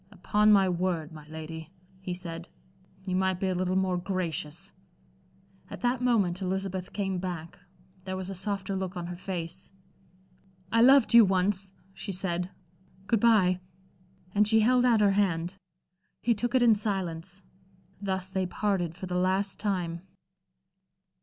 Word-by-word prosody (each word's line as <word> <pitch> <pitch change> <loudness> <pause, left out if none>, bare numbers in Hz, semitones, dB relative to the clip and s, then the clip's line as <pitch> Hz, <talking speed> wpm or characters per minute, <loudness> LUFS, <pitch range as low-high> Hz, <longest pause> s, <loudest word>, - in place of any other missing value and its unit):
"Upon 210 +2 +2
my 195 -2 +6
word, 175 -3 -1
my 155 -2 -11
lady," 160 0 -7 0.3
he 185 -1 -4
said, 170 -1 -7 0.6
"you 185 -2 -1
might 190 -1 +1
be 190 - 0
a - - +1
little 185 +1 0
more 185 -1 +1
gracious." 175 -1 -3 1.0
At - - -8
that 245 0 +1
moment 200 -7 +2
Elizabeth 190 -1 -3
came 195 -2 -2
back. 175 -3 -6 0.5
There 185 0 -3
was 185 -1 -4
a 195 - -4
softer 195 0 -2
look 190 -1 -3
on 175 - -4
her 175 0 -5
face. 175 0 -6 1.0
"I 230 - +4
loved 265 0 +6
you 235 -1 +10
once," 190 0 +1 0.2
she 195 - -6
said. 180 -1 -2 0.6
"Good 225 +2 +2
bye." 200 -5 +4 0.7
And 210 0 +4
she 220 0 +5
held 250 +2 +4
out 230 -3 +4
her 205 -1 +5
hand. 185 -2 0 0.7
He 235 - +3
took 240 +4 -2
it 255 - +5
in 235 -2 +7
silence. 190 -3 -3 0.6
Thus 190 -1 -2
they 190 -1 0
parted 180 -4 -1
for 185 - -7
the 180 - -5
last 190 +2 0
time. 180 -5 -2
190 Hz, 155 wpm, -28 LUFS, 180-205 Hz, 1.0 s, you